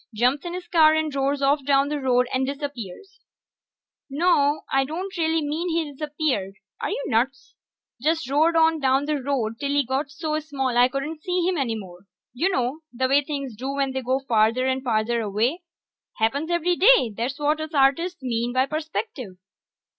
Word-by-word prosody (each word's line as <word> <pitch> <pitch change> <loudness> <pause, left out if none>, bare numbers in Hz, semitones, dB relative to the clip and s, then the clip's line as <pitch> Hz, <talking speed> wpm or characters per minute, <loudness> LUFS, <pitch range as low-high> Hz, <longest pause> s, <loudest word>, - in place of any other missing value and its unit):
Jumps 250 +6 +2
in 345 0 -4
his 360 -1 -7
car 315 -2 +5
and 315 -2 -1
roars 275 +1 0
off 280 +1 +2
down 275 0 +3
the 295 0 -2
road 250 -2 +2
and 260 0 +1
disappears. 280 - -7 0.9
Naw, 295 -1 +2
I 270 0 +4
don't 355 +8 -5
mean 320 0 0
he 335 0 +1
really 295 - -8
disappeared 285 -9 -2 0.2
are - - -2
you 280 - -3
nuts? 260 +3 -1 0.5
Just 320 0 0
roared 310 +5 +2
on 320 0 +4
down 270 0 +2
the 300 -2 -1
road 245 -5 -2
till 280 -1 -2
he 285 -1 +2
got 265 +3 -2
so 305 +2 -2
small 275 -5 -3
I 245 +1 +6
couldn't 275 +4 -4
see 360 +2 -1
him 370 - +2
no 265 -9 -1
more. 185 -2 -11 0.3
You 320 +10 +1
know 260 -3 -1
the 260 +2 0
way 275 +2 +4
things 275 -5 -5
do 260 +5 -4
when 275 -1 0
they 265 0 -3
go 260 +1 0
farther 225 +3 +3
and 260 0 0
farther 230 -1 0
away. 225 - 0 0.6
Happens 275 +8 0
every 345 0 +1
day; 395 - +5
that's 245 +5 -3
what 300 +1 0
us 315 0 -6
artists 285 +5 +2
mean 240 -1 -1
by 260 +1 +3
perspective. 305 - -5
280 Hz, 185 wpm, -24 LUFS, 255-315 Hz, 0.9 s, I